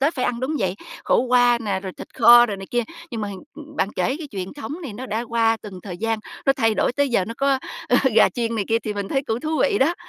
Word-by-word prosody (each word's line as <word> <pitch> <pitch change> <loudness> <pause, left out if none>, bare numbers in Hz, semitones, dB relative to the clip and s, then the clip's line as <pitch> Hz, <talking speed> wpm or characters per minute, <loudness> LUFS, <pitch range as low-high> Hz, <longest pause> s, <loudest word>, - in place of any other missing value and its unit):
Tết 295 +4 +2
phải 255 - -1
ăn, 240 -1 -1
đúng 280 +5 -1
vậy, 190 -5 0 0.3
khổ - - +3
qua 245 -1 +4
nè, 205 -4 -2
rồi 190 -1 -6
thịt - - -9
kho 240 0 +8
rồi 205 - -4
này 195 0 -9
kia. 240 0 +1 0.3
Nhưng 230 -3 -4
mà 205 - -3
hình 195 -2 -7
ưm, 300 -1 -12
bạn 195 - +1
kể 260 - 0
cái 315 -3 -7
truyền 190 -2 -5
thống 285 0 -6
này 275 -9 -6
nó 250 +5 -7
đã 225 0 -2
qua 225 -1 +2
từng 190 -3 -9
thời 180 -4 -7
gian, 225 +2 -1 0.3
nó 275 - +6
thay 225 -4 +1
đổi - - +1
tới 285 +2 +1
giờ 230 -7 +1
nó 230 +4 -6
có, 275 -1 +2 0.3
ờ, 245 - +4 0.2
gà - - +6
chiên 230 -1 -2
này 215 -3 -1
kia 225 - +3
thì 210 - -3
mình 200 -1 -4
thấy 270 - 0
cũng 235 -4 -2
thú 310 - -3
vị - - +2
đó. 305 +6 +3
235 Hz, 290 wpm, -22 LUFS, 210-265 Hz, 0.3 s, kho